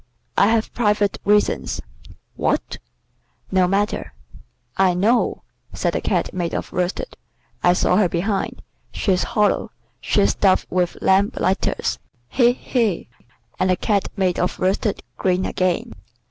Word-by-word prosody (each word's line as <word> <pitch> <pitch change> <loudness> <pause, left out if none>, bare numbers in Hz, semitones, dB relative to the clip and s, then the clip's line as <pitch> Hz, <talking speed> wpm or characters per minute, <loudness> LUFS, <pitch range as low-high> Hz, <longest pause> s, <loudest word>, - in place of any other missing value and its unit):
"I - - +5
have 225 0 +1
private 210 -3 +1
reasons." 210 0 +1 0.6
"What?" - - -1 0.7
"No 185 -1 +3
matter." 200 +3 -1 0.6
"I 185 -2 +3
know," 220 +7 +1 0.3
said - - -1
the - - -1
Cat - - -1
made 175 -2 -2
of - - -4
worsted. 180 - -2 0.5
"I 175 - +5
saw - - +2
her 200 -4 +3
behind. 195 +4 -2 0.3
She's 185 -3 +1 0.2
hollow. 210 -1 +2 0.3
She's 100 - +2
stuffed 190 -2 +2
with 180 -1 0
lamp 195 +2 +3
lighters. 190 +1 0 0.3
He! 245 -2 +4
he!" 230 - -1 0.5
and 185 - +2
the 185 - +4
Cat 200 +1 0
made 185 -2 +1
of 180 - -1
worsted 195 +3 0
grinned 185 0 +1
again. 185 -1 -1
190 Hz, 130 wpm, -21 LUFS, 180-210 Hz, 0.7 s, I